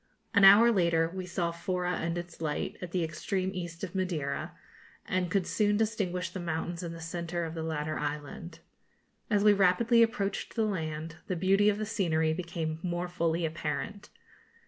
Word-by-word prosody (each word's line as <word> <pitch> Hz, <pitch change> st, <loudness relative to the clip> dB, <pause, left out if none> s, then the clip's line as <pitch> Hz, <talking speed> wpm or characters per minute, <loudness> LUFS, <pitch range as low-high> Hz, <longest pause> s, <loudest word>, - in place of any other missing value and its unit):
An 200 Hz, -3 st, +5 dB
hour 210 Hz, +5 st, +9 dB
later 170 Hz, -5 st, +2 dB
we 185 Hz, -1 st, -5 dB
saw 175 Hz, -1 st, -1 dB
Fora 180 Hz, +1 st, -2 dB
and 170 Hz, +1 st, -2 dB
its 175 Hz, -1 st, -7 dB
light, 150 Hz, -2 st, -2 dB
at 180 Hz, -, -5 dB
the 175 Hz, 0 st, 0 dB
extreme 185 Hz, +4 st, -2 dB
east 170 Hz, -1 st, -6 dB
of 185 Hz, -, -4 dB
Madeira, 175 Hz, -7 st, -2 dB, 0.5 s
and 180 Hz, -1 st, 0 dB
could 190 Hz, 0 st, +1 dB
soon 210 Hz, -1 st, +2 dB
distinguish 205 Hz, -5 st, -1 dB
the 190 Hz, -, -5 dB
mountains 170 Hz, 0 st, -3 dB
in 170 Hz, -2 st, -5 dB
the 165 Hz, -, -8 dB
centre 170 Hz, +1 st, -3 dB
of 160 Hz, -1 st, -4 dB
the 165 Hz, -, -4 dB
latter 155 Hz, -1 st, -2 dB
island. 150 Hz, +3 st, -5 dB, 0.7 s
As 205 Hz, -2 st, +3 dB
we 210 Hz, -1 st, +7 dB
rapidly 215 Hz, +5 st, +4 dB
approached 200 Hz, -3 st, 0 dB
the 225 Hz, -2 st, +2 dB
land, 160 Hz, -4 st, -3 dB
the 185 Hz, -, -1 dB
beauty 195 Hz, +4 st, +4 dB
of 205 Hz, -, +1 dB
the 215 Hz, -, -2 dB
scenery 165 Hz, -7 st, +1 dB
became 165 Hz, -2 st, -3 dB
more 175 Hz, 0 st, -2 dB
fully 170 Hz, -1 st, 0 dB
apparent. 160 Hz, +6 st, -4 dB
175 Hz, 175 wpm, -30 LUFS, 165-195 Hz, 0.7 s, hour